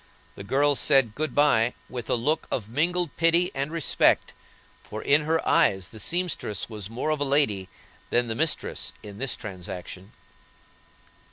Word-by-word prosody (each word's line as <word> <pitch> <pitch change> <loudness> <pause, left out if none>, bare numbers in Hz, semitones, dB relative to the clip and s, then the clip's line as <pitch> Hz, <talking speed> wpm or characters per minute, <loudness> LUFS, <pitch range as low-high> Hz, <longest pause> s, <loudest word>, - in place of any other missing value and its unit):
The 100 - -9
girl 140 +7 +2
said 135 -6 +3
"Good 155 +6 -3
bye," 125 -5 +3
with 120 -3 -7
a - - +3
look 150 +7 0
of 105 -5 -2
mingled 170 +7 -1
pity 170 +2 +3
and 140 +3 -2
respect, 165 -3 +2 0.5
for 110 - -8
in 150 +1 +3
her 160 +1 0
eyes 95 - +3
the 110 - -11
seamstress 165 - -2
was 105 -3 -7
more 125 +7 -2
of 155 - -1
a - - +1
lady 135 -10 +1 0.4
than 120 0 +1
the 115 - -2
mistress 155 +7 -1
in 100 -1 -10
this 135 -1 0
transaction. 95 0 -8
135 Hz, 160 wpm, -26 LUFS, 105-155 Hz, 0.5 s, said